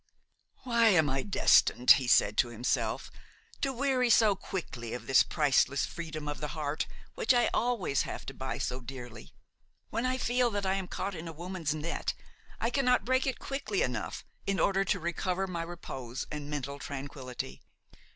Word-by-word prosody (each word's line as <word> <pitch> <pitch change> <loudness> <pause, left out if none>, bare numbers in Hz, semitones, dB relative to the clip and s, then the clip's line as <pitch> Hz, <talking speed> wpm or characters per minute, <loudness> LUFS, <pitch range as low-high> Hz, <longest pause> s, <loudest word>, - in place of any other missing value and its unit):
"Why 235 -2 +4
am 160 -9 +4
I 135 0 0
destined," 125 -8 +5
he 130 -3 +6
said 105 -3 +5
to 120 - +4
himself, 120 +1 -1 0.5
"to 275 - +1
weary 260 -1 +1
so 220 -3 +5
quickly 125 -12 -5
of 120 -1 -7
this 135 0 +6
priceless 140 -2 +2
freedom 155 -3 -6
of 145 +1 -4
the 150 +1 -4
heart 150 0 -2 0.3
which 470 - +2
I 240 - +3
always 230 - +1
have - - -5
to 135 - -6
buy 130 0 -4
so 125 +1 -3
dearly? 120 -2 -9 0.6
When 230 +3 0
I 255 0 0
feel 245 -1 +2
that 205 -2 -2
I 190 - +2
am 195 -1 -2
caught 195 +2 -3
in 165 -1 -6
a - - -5
woman's 170 -1 -3
net, 155 +2 -2 0.4
I 230 - 0
cannot 250 -6 +2
break 260 +2 +2
it 265 - -1
quickly 285 - -2
enough, - - -3 0.2
in 195 -1 +1
order 195 0 +3
to - - +1
recover 180 +3 -1
my 175 -3 -4
repose 135 -8 -6
and 150 -1 -5
mental 140 -1 -4
tranquillity. 135 -3 -6
170 Hz, 175 wpm, -30 LUFS, 135-230 Hz, 0.6 s, he